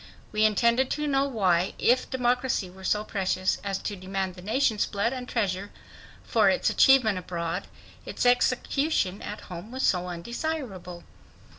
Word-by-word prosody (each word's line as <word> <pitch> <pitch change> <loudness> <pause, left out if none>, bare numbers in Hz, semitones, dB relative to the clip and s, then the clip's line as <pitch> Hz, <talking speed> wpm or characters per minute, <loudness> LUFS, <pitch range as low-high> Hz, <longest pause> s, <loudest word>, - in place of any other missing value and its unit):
We 215 0 +3
intended 235 +4 +3
to 300 - -2
know 275 -1 +2
why, 190 -8 +1
if 255 +2 +2
democracy 245 -6 0
were 190 +1 -14
so 210 +3 +1
precious 190 -3 -1
as 195 -1 -2
to 205 - -3
demand 190 0 -3
the 180 - -12
nation's 220 +1 +1
blood 215 +4 -1
and 250 -1 -6
treasure 200 -3 -1 0.5
for - - +3
its - - +2
achievement 245 -8 +5
abroad, 170 0 -4 0.4
its - - -3
execution 245 - +1
at 210 - -6
home 180 +4 -9
was 260 +1 -3
so 180 -1 +2
undesirable. 190 - -5
210 Hz, 150 wpm, -27 LUFS, 185-250 Hz, 0.5 s, achievement